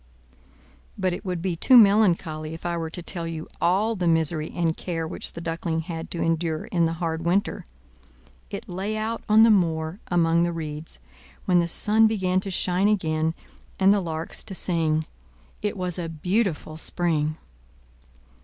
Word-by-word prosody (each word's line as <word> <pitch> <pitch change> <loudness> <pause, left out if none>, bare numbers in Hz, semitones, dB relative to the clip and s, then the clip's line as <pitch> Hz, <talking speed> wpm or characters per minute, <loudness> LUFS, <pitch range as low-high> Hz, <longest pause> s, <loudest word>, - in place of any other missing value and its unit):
But 185 -2 0
it 180 - -6
would 180 -3 -3
be 185 -3 -1
too 255 +9 +6
melancholy 170 -8 +4
if 165 - -12
I 175 0 -1
were 165 -1 -3
to 175 +2 -7
tell 170 -1 -5 0.3
all 200 +6 +2
the 180 -3 -1
misery 160 -1 +1
and 165 -2 +1
care 165 -3 -3
which - - -6
the 170 - -7
Duckling 165 -1 -2
had 165 -1 -6
to 170 - -3
endure 165 -1 0
in 170 -2 +1
the 165 - 0
hard 165 -1 -3
winter. 180 +4 0 0.9
It - - -7
lay 195 +4 -3
out 225 +1 -2
on 215 +1 +7
the 225 - +7
moor 165 -2 +1
among 170 -1 +3
the 175 0 +1
reeds, 155 - -6 0.5
when 180 -1 +4
the 170 - +1
sun 215 +5 +4
began 190 -4 +1
to 195 - -4
shine 185 +1 +1
again 160 -5 +1 0.4
and 195 +1 +6
the 205 - +1
larks 160 -2 -4
to 195 - -6
sing: 160 -4 0 0.6
it 210 0 -2
was 180 -1 -2
a 165 -1 -3
beautiful 165 -1 -1
spring. 160 -2 -1
170 Hz, 170 wpm, -25 LUFS, 160-190 Hz, 0.9 s, on